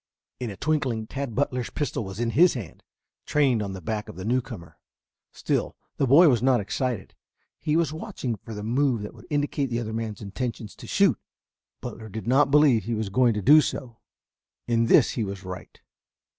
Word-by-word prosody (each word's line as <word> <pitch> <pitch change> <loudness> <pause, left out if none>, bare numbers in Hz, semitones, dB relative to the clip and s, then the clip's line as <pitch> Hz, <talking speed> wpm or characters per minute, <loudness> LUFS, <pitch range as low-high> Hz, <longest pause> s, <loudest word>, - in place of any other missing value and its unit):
In 125 - -3
a 100 - -8
twinkling 130 - -1
Tad 135 -1 -5
Butler's 125 -3 -1
pistol 145 -6 -3
was 95 +1 -7
in 120 -1 0
his 170 +7 +5
hand, 110 -9 -7 0.5
trained 135 -6 +2
on 100 -2 -4
the 95 - -7
back 105 +4 -4
of - - -9
the 95 +2 -7
newcomer. 110 -9 -3 0.5
Still, - - -2 0.2
the 135 - +1
boy 155 +7 +7
was 120 -6 +3
not 130 -1 +3
excited; 115 +1 -3 0.5
he 150 - 0
was 160 -3 +1
watching 130 -6 -4
for 110 +3 -9
the 105 - -6
move 120 0 +1
that 105 - -7
would - - -15
indicate 145 -2 0
the 120 0 -1
other 110 -2 -4
man's 110 -2 -4
intention 110 +4 -4
to - - -12
shoot. - - +3 0.6
Butler 110 -1 -7
did 110 +2 -6
not 135 +4 +4
believe 140 -6 +4
he 115 0 -1
was 110 -2 -2
going 120 +1 +3
to 105 - -3
do 150 +6 +8
so. 120 -5 -5 0.7
In 115 -1 +2
this - - +5
he 115 - -2
was 100 -1 -6
right. 90 -1 -9
120 Hz, 195 wpm, -25 LUFS, 105-135 Hz, 0.7 s, do